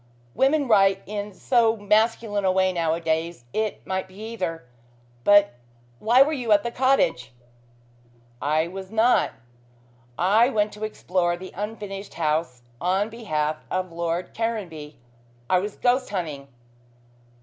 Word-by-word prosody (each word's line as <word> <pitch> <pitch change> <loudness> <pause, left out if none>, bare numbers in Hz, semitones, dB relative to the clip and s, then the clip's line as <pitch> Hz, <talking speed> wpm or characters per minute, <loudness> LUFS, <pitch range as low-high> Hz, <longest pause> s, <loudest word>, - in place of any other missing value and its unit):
Women 280 - +2
write 195 -3 +4
in 205 0 -5
so 230 +3 +2
masculine 210 0 +1
a 190 - +3
way 185 0 +2
nowadays. 165 -3 -1
It 215 -1 -2
might 190 0 -2
be 185 - -18
either. 190 - -5 0.6
But 205 -3 +5 0.5
why 240 - +6
were 305 +3 -2
you 245 -6 -2
at 205 -1 +5
the 235 - -3
cottage 260 - +1 0.6
" 120 0 -32 0.2
"I 160 +1 +2
was 190 +1 -8
not. 225 +3 +3 0.9
I 215 +7 +4
went 210 -4 0
to 210 +1 -4
explore 180 -4 -1
the 185 +1 -10
unfinished 205 -1 -6
house 155 -6 -1 0.2
on 190 +4 +1
behalf 155 -9 -2
of 185 -1 -2
Lord 170 +1 -3
Caranby. 180 -10 -4 0.5
I 185 - +3
was 205 +2 -4
ghost 255 +1 +1
hunting. 155 -8 -4
195 Hz, 135 wpm, -24 LUFS, 170-220 Hz, 0.9 s, why